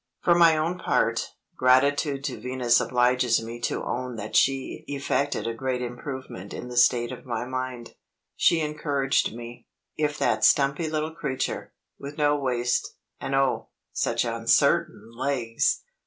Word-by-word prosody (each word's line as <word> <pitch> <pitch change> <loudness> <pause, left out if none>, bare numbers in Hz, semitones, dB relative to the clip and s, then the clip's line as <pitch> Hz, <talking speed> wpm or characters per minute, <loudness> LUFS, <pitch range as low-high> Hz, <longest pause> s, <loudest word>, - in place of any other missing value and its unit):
For 175 - +5
my 170 -2 +5
own 170 +4 -1
part, - - 0 0.3
gratitude 140 +2 +3
to 135 -4 -4
Venus 125 -2 +2
obliges 125 -1 +2
me 115 +1 -7
to - - -2
own 125 0 -3
that 110 0 -6
she 135 -1 +1
effected 140 0 -1
a 115 - -1
great 125 +1 -2
improvement 120 -5 -7
in 125 - -7
the 125 - -7
state 120 0 +3
of 130 - -8
my 120 -2 -3
mind. 130 -2 -5 0.4
She 170 -2 +3
encouraged 145 -3 0
me. 120 0 -10 0.3
If 150 -1 0
that - - +1
stumpy 140 +3 +3
little 155 0 -2
creature 130 -4 -3 0.3
with 140 +1 -8
no 145 -1 +3
waist, 125 -3 -1 0.2
and 135 - -2
oh, 135 -1 +1 0.2
such - - 0
uncertain 115 +1 +1
legs! 120 -3 0
130 Hz, 145 wpm, -26 LUFS, 120-145 Hz, 0.4 s, For